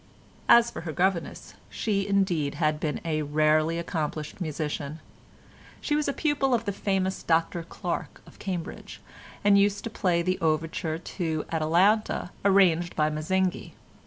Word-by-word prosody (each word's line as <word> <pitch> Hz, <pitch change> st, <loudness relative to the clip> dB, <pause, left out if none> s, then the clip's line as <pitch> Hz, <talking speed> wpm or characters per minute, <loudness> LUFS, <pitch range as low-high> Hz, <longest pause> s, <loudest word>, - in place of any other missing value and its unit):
As 235 Hz, 0 st, +7 dB
for -, -, -6 dB
her 165 Hz, -1 st, -5 dB
governess, 180 Hz, +2 st, -1 dB, 0.2 s
she 200 Hz, -3 st, -1 dB
indeed 185 Hz, -8 st, +1 dB
had 155 Hz, -2 st, +1 dB
been 150 Hz, -1 st, -2 dB
a 155 Hz, -2 st, 0 dB
rarely 155 Hz, +2 st, +2 dB
accomplished 155 Hz, -1 st, -4 dB
musician: 150 Hz, -1 st, -3 dB, 0.8 s
she 295 Hz, -, -1 dB
was 300 Hz, 0 st, 0 dB
a -, -, +2 dB
pupil 280 Hz, -3 st, +1 dB
of 230 Hz, -1 st, -2 dB
the 200 Hz, -, 0 dB
famous 190 Hz, -1 st, -1 dB
Dr 165 Hz, +1 st, +1 dB
Clarke 170 Hz, +1 st, -5 dB
of -, -, -17 dB
Cambridge, 180 Hz, -4 st, -5 dB, 0.4 s
and 200 Hz, 0 st, +6 dB
used 200 Hz, 0 st, +2 dB
to 230 Hz, -, -5 dB
play 175 Hz, -5 st, +1 dB
the 185 Hz, +1 st, 0 dB
overture 160 Hz, 0 st, -1 dB
to 165 Hz, -2 st, -3 dB
Atalanta, 175 Hz, +6 st, +2 dB
arranged 180 Hz, -4 st, +3 dB
by 155 Hz, 0 st, +2 dB
Mazzinghi. 185 Hz, +4 st, -1 dB
170 Hz, 145 wpm, -27 LUFS, 155-195 Hz, 0.8 s, As